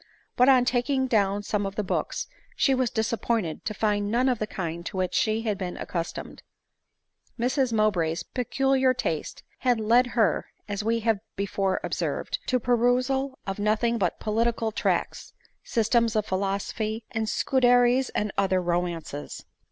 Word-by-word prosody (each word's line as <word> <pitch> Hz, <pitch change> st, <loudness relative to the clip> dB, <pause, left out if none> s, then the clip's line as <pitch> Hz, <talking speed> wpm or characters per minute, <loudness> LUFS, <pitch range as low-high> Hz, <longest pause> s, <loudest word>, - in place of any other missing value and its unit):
But, 250 Hz, +2 st, +5 dB
on 255 Hz, -2 st, +6 dB
taking 260 Hz, +2 st, +1 dB
down 205 Hz, -4 st, +1 dB
some 205 Hz, 0 st, -1 dB
of 195 Hz, 0 st, -4 dB
the 210 Hz, -, -1 dB
books, 185 Hz, -, -2 dB, 0.3 s
she 270 Hz, -, +3 dB
was 255 Hz, -2 st, +1 dB
disappointed 220 Hz, -6 st, -1 dB
to 215 Hz, -, -2 dB
find 205 Hz, -1 st, 0 dB
none 245 Hz, +4 st, +2 dB
of 245 Hz, -3 st, 0 dB
the 215 Hz, -, -2 dB
kind 170 Hz, -4 st, -4 dB
to -, -, -6 dB
which 185 Hz, -1 st, -1 dB
she 220 Hz, 0 st, +1 dB
had 210 Hz, -4 st, -1 dB
been 180 Hz, -2 st, -4 dB
accustomed. 170 Hz, -2 st, -5 dB, 1.0 s
Mrs 255 Hz, +1 st, +1 dB
Mowbray's 175 Hz, -7 st, +1 dB
peculiar 265 Hz, +2 st, +1 dB
taste 165 Hz, -11 st, -3 dB, 0.2 s
had 245 Hz, -3 st, +2 dB
led 235 Hz, +3 st, +4 dB
her, 210 Hz, -8 st, +2 dB, 0.2 s
as 205 Hz, 0 st, -3 dB
we 230 Hz, +1 st, +1 dB
have 220 Hz, -2 st, +1 dB, 0.2 s
be 200 Hz, -, -1 dB
fore 195 Hz, -1 st, 0 dB
observed, -, -, -2 dB
to 255 Hz, -, +1 dB
the -, -, +3 dB
perusal 255 Hz, +3 st, +1 dB
of 195 Hz, +1 st, -4 dB
nothing 220 Hz, +3 st, +1 dB
but 180 Hz, -4 st, 0 dB
political 225 Hz, +1 st, 0 dB
tracts, -, -, -1 dB, 0.3 s
systems 230 Hz, 0 st, +1 dB
of 215 Hz, -1 st, +1 dB
philosophy, 200 Hz, +3 st, -2 dB
and 220 Hz, -1 st, -1 dB
Scuderi's 245 Hz, 0 st, +3 dB
and 210 Hz, -1 st, -2 dB
other 190 Hz, -1 st, +2 dB
romances. 170 Hz, -4 st, -3 dB
220 Hz, 160 wpm, -26 LUFS, 195-245 Hz, 1.0 s, on